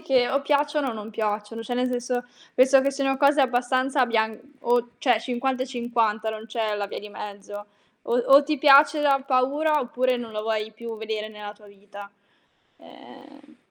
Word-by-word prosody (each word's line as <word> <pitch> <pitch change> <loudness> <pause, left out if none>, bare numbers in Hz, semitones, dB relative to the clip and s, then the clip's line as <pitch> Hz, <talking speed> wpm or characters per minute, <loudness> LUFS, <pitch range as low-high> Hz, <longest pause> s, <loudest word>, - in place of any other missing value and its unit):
che 260 -6 +2
o 275 - 0
piacciono 290 0 0
o - - -5
non 215 0 -8
piacciono. 215 +1 -3
Cioè 245 +2 -4
nel 250 +1 0
senso, 245 0 -3 0.3
penso 265 +1 +5
che 275 +1 +1
siano 270 -1 -1
cose 280 +2 +3
abbastanza 255 +1 +1
bian 220 -2 0 0.2
o 240 -1 +1
cioè 245 -5 +2
50 255 +1 -2
e - - -11
50, 230 -4 -1
non 220 0 -8
c'è 220 -2 -2
la 200 -1 -3
via - - -7
di 210 - -10
mezzo. 205 0 -9 0.4
O 235 - -1
o 275 +3 +6
ti 305 +1 -1
piace 290 +2 +6
da 275 -2 +3
paura, 290 +4 +1
oppure 250 0 0
non 235 -2 -7
la 215 - -3
vuoi 220 0 -2
più 225 0 -8
vedere 215 0 -4
nella 210 -1 -9
tua 210 0 -20
vita. 200 0 -13 0.7
Ehm 285 +1 -17
245 Hz, 185 wpm, -24 LUFS, 220-270 Hz, 0.7 s, o